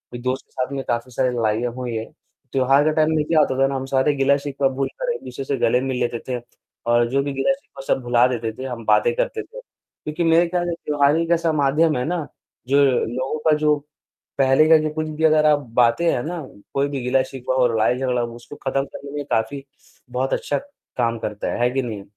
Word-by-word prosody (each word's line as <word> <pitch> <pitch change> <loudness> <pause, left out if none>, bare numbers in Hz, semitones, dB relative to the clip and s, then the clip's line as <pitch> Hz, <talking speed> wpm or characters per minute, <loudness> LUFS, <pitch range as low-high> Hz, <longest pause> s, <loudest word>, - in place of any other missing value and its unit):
एक 120 - -6
दोस्त 130 +1 -2
के - - -40
साथ 130 +2 -3
में 135 - -3
काफ़ी 120 +1 -2
सारे 130 +1 +1
लड़ाईयाँ 115 +1 0
हुई 125 -2 -4
हैं। 110 0 -3 0.5
त्योहार 135 +2 +3
के 155 - +3
टाइम 155 0 +3
में 155 - +2
क्या 160 0 +3
होता 130 -3 +2
था 135 - +5
ना 135 - -3
हम 135 0 -3
सारे 135 +2 +2
गिला-शिकवा 140 0 +1
भूलकर 485 - -2
एक - - -8
दूसरे 130 +2 -6
से 140 - -1
गले 125 +1 +2
मिल 130 -1 -2
लेते 120 -1 -1
थे 125 -1 -2 0.5
और 120 0 +4
जो 135 +2 +1
भी 140 - -3
गिला-शिकवा 135 - -2
सब - - -3
भुला 120 0 +4
देते 115 -3 -2
थे, 130 - -7
हम 120 -4 -6
बातें 475 -1 +3
करते - - -1
थे - - -11
क्योंकि 160 - -7
मेरे 165 +1 +4
ख्याल 175 0 -1
से 170 - -1
त्योहार 145 0 +3
ही 165 0 0
ऐसा 165 -1 +1
माध्यम 150 +1 +2
है 125 - -1
ना, 170 -1 -2 0.4
जो 140 +2 +4 0.3
लोगों 130 +6 -3
का 150 - +5
जो 150 0 +3 0.6
पहले 135 +3 +4
का 160 - +8
जो 155 0 -1
कुछ 155 0 -2
भी 160 - -2
अगर 155 -1 +4
आप 150 -1 +5 0.2
बातें 120 +8 +4
है 120 - -1
ना, 175 -2 -4 0.3
कोई 140 +1 +1
भी 140 -2 -3
गिला-शिकवा 130 0 0
हो, 125 -1 +4
लड़ाई 115 +1 +1
झगड़ा 125 -2 0
हो, 120 0 -4
उसको 120 +5 -11
खत्म 135 0 -1
करने 140 0 -10
में 145 -1 -4
काफ़ी 115 +5 -1 0.5
बहुत 130 +2 -1
अच्छा 145 - -1 0.4
काम 115 -2 +1
करता 105 -1 -3
है। - - -4
है 120 - +4
कि 135 +1 0
नहीं? 110 -5 -5
135 Hz, 230 wpm, -22 LUFS, 125-150 Hz, 0.6 s, का